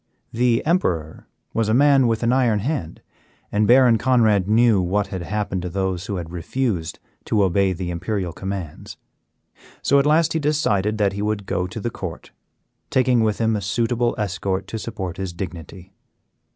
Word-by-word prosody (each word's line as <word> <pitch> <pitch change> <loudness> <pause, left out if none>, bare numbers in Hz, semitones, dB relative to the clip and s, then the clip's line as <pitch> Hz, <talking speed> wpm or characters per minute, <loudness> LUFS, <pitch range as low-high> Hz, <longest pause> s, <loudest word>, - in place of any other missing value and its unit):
The 120 0 +1
Emperor 90 - -1 0.3
was 115 -1 0
a 110 - +3
man 140 -1 +5
with 115 0 0
an 115 +1 +2
iron 125 -5 +2
hand, 105 - -4 0.5
and 105 0 +2
Baron 125 -2 +5
Conrad 110 -6 +3
knew 110 -2 +4
what 95 +3 0
had 95 - -3
happened 95 +1 -3
to 90 - -4
those 95 0 -2
who 100 - -3
had 85 -3 -6
refused 90 0 -2 0.3
to 105 -2 +2
obey 95 +1 +2
the 90 -1 -4
imperial 90 0 -3
commands. 95 -4 -6 0.9
So 140 - +4
at 140 - +2
last 160 +2 +3
he 160 - 0
decided 110 -9 0
that 100 -2 +1
he 100 - -4
would 105 -1 -2
go 90 -1 -1
to 95 +5 -7
the 115 +3 -3
court, 90 -6 -7 0.6
taking 125 -2 +3
with 110 -2 +1
him 110 -1 +1
a 105 - -2
suitable 120 +4 0
escort 95 -1 -2
to 110 - -4
support 95 -5 -5
his 95 -2 -4
dignity. 90 +1 -8
105 Hz, 175 wpm, -22 LUFS, 95-120 Hz, 0.9 s, man